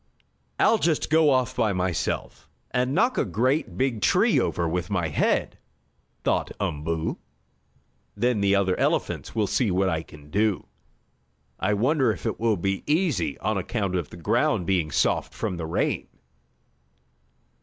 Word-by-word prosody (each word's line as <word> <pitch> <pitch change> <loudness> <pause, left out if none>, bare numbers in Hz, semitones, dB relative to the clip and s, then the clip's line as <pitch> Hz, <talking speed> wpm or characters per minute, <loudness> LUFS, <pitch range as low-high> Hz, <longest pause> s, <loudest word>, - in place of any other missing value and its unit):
"I'll 220 0 +4
just 160 -3 0
go 160 -1 +5
off 130 -1 +1
by 110 -4 +1
myself 90 -3 -2 0.2
and 125 +2 0
knock 245 +8 +2
a - - +3
great 130 - 0
big 130 -5 0
tree - - +3
over 85 - 0
with 90 +3 -2
my 90 -5 0
head," 75 - 0 0.6
thought - - 0
Umboo. 80 +2 -2 1.0
"Then 120 -3 +1
the 100 0 +3
other 95 -2 +2
elephants - - -1
will 110 -2 +2
see 115 +2 +1
what 95 +1 +2
I 80 -2 -1
can 75 -2 -15
do. 105 0 +1 0.9
I 105 +2 +1
wonder 130 +3 +2
if - - -7
it - - -2
will 110 -2 +2
be 95 +2 -2
easy, 160 0 +1
on 105 0 0
account 100 0 -2
of 90 -5 -2
the - - -11
ground 85 +1 +1
being 90 -5 +1
soft 70 - 0
from 90 - -3
the 80 -2 -4
rain?" 80 - -1
100 Hz, 155 wpm, -25 LUFS, 90-125 Hz, 1.0 s, go